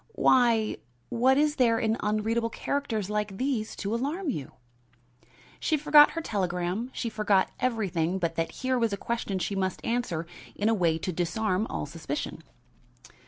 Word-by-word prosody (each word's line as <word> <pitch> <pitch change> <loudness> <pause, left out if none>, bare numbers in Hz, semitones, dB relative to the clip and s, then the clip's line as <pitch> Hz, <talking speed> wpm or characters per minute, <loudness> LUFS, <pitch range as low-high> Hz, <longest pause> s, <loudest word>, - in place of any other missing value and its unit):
"Why, 235 -4 +3 0.3
what 260 +3 +3
is 300 +1 +2
there 235 -4 +4
in 220 -1 +1
unreadable 220 +2 0
characters 230 -7 -2
like 210 -2 -2
these 255 -4 -1
to 205 +1 -3
alarm 290 +8 -1
you?" 145 - -6 1.1
She 310 - +1
forgot 295 0 +7
her - - 0
telegram, 185 - -2
she 240 - -3
forgot 210 -3 +2
everything 190 -8 0
but 170 -3 -1
that 165 0 -1
here 255 -1 +1
was 230 -3 +1
a - - -1
question 230 -3 -2
she 185 - -2
must 190 -1 -2
answer 230 -9 -1 0.3
in 210 +2 +1
a - - +4
way 170 -6 +2
to 180 +3 -3
disarm 185 +4 0
all - - -3
suspicion. 150 0 -5
215 Hz, 160 wpm, -28 LUFS, 185-245 Hz, 1.1 s, forgot